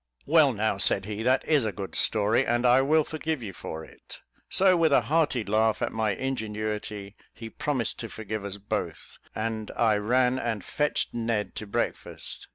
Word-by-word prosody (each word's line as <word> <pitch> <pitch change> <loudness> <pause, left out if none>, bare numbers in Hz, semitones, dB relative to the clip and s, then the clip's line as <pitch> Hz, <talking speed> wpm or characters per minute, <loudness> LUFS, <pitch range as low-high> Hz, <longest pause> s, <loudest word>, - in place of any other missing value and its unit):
"Well, 150 -2 +5
now," 105 -3 -1
said 100 -1 +2
he, 105 +1 -4
"that 130 +3 +2
is 150 -5 +3
a 110 - -1
good 100 -1 -7
story, 110 +1 +2
and 120 +1 0
I 125 +2 +6
will 155 +3 +3
forgive 155 -3 -3
you 100 -3 -6
for 80 -2 -7
it." - - -13 0.3
So 190 -1 +4
with 165 -3 +3
a 140 - +5
hearty 145 -1 +1
laugh 110 +2 +2
at - - -1
my 110 -3 0
ingenuity, 105 -4 -4 0.2
he 115 -1 -8
promised 130 -4 -1
to 115 - -5
forgive 110 -1 -5
us 100 0 -5
both, 105 +1 -5 0.2
and 110 -1 -3
I 110 -3 +3
ran 125 +4 +2
and 110 -6 -2
fetched 150 - -1
Ned 115 -3 -1
to 110 - -6
breakfast. - - -4
110 Hz, 180 wpm, -27 LUFS, 105-130 Hz, 0.3 s, I